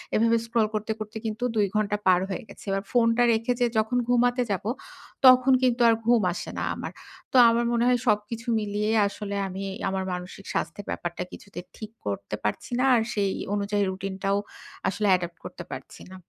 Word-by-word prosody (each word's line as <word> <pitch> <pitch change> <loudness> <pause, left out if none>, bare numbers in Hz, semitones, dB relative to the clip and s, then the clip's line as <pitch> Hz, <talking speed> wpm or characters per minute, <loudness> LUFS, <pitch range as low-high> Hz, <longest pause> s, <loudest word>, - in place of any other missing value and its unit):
এভাবে 230 +1 +4
স্ক্রল 230 -1 +1
করতে, 215 +1 -2
করতে 215 +1 -6
কিন্তু 220 +2 -3
২ 210 -2 +3
ঘণ্টা 210 -1 +1
পার 180 -1 +6
হয়ে 200 +6 -4
গেছে। - - -13
এবার 195 0 -1
ফোনটা 235 0 +3
রেখে 230 +2 +1
যে 245 - +4
যখন 220 +3 +1
ঘুমাতে 245 +1 +3
যাবো, 200 +2 -2 0.6
তখন 255 +1 +7
কিন্তু 245 -1 +2
আর 225 - +5
ঘুম 235 -1 +4
আসে - - -6
না - - -2
আমার। - - -6 0.4
তো - - -7
আমার 235 +1 +1
মনে 235 0 +2
হয় 250 -1 +3
সবকিছু 215 +2 0
মিলিয়ে 210 0 -2 0.2
আসলে 200 0 -5
আমি 190 +1 -6 0.3
আমার 190 0 -2
মানসিক 180 +2 -7
স্বাস্থ্যের 170 +5 -3
ব্যাপারটা 175 0 -4
কিছুতে 200 -3 -10 0.2
ঠিক 215 -1 -8
করতে 100 0 -3
পারছি 105 - -3
না। 260 - +3
আর 230 - +3
সেই 200 -3 0 0.2
অনুযায়ী 205 0 0
রুটিনটাও 195 +1 -2 0.5
আসলে 205 +2 0
অ্যাডপ্ট 175 -2 +1
করতে - - -7
পারছি - - -9
না। - - -9
210 Hz, 185 wpm, -26 LUFS, 195-230 Hz, 0.6 s, তখন